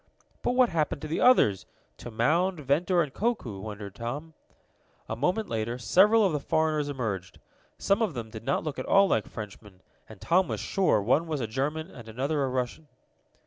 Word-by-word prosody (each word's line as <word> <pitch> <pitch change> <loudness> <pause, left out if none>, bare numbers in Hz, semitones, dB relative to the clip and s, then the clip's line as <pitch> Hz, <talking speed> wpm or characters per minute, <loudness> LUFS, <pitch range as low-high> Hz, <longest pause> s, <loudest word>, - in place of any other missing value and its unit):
"But - - 0
what 250 -1 +4
happened 155 -4 -1
to - - -3
the 160 - -2
others 110 - +4 0.3
to - - -8
Mound, 160 +11 +1
Ventor 165 +6 +2
and 145 -3 -7
Koku?" 200 - -2
wondered 105 -1 -7
Tom. 145 +9 -6 0.7
A 110 - -3
moment 180 - 0
later 115 +2 -2
several 195 - +4
of 185 - +1
the 150 - 0
foreigners 155 0 0
entered. 100 -9 -4 0.4
Some 200 +3 +1
of 205 -10 0
them 115 -2 -6
did 110 0 -8
not 135 +3 0
look 155 -2 -4
at - - -5
all 195 0 +5
like 110 - 0
Frenchmen, 105 -2 -10 0.3
and 110 -3 -12
Tom 180 - +2
was - - -3
sure 185 - +1
one 140 +10 +2
was 155 -3 -2
a 120 - -1
German 150 - -3
and 115 -3 -11
another 140 +6 -1
a - - 0
Russian. 130 +4 -3
145 Hz, 190 wpm, -28 LUFS, 110-170 Hz, 0.7 s, all